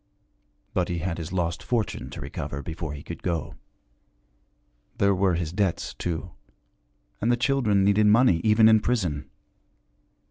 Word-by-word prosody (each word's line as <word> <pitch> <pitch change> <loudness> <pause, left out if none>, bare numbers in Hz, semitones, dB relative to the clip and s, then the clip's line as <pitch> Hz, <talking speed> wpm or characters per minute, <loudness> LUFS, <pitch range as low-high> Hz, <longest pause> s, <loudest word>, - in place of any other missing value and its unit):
But - - 0
he 85 - -1
had 85 0 -3
his 80 0 -6
lost 85 -2 -1
fortune 115 -4 -2
to - - -8
recover 70 0 -5
before 80 0 -5
he 70 - -9
could 85 - -8
go. 85 -5 -2 1.4
There 100 0 +3
were 95 -2 +2
his 80 -2 -2
debts, 95 -3 -1
too; 85 +1 -4 0.9
and 115 - +2
the 120 - +2
children 120 -6 +2
needed 100 +2 +4
money, 105 -6 +5
even 110 0 +5
in 110 -1 +6
prison. 90 - -1
95 Hz, 145 wpm, -25 LUFS, 85-110 Hz, 1.4 s, in